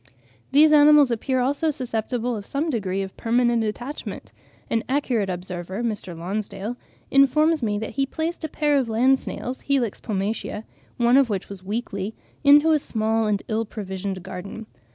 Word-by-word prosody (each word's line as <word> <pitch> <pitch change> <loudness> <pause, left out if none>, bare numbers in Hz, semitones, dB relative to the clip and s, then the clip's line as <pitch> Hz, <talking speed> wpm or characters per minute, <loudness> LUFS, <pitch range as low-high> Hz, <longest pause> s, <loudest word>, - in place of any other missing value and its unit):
These 300 +2 +6
animals 295 -2 +7
appear 255 +3 0
also 285 +5 +1
susceptible 245 -2 -2
of 205 - -5
some 290 +9 -2
degree 195 -5 -1
of 190 - -8
permanent 235 0 +2
attachment: 240 +7 -6 0.3
an 225 0 0
accurate 250 -7 0
observer, 180 +3 -5
Mr. 205 -7 -3
Lonsdale, 200 +5 -4 0.4
informs 305 +3 +4
me 210 -3 0
that 220 +1 -4
he 275 0 -1
placed 320 +4 -3
a 315 - -2
pair 295 -1 +2
of 250 -4 -2
land 255 +4 +3
snails, 255 +1 -5
(Helix 260 -7 0
pomatia), 210 0 -3 0.3
one 240 +2 +4
of 275 -3 +4
which 200 -3 -3
was 195 -2 -9
weakly, 205 0 -4 0.3
into 295 +3 +7
a 310 - +4
small 220 -3 0
and 205 -2 0
ill 220 +1 0
provided 190 -3 -5
garden. 190 +4 -7
230 Hz, 160 wpm, -24 LUFS, 205-275 Hz, 0.4 s, animals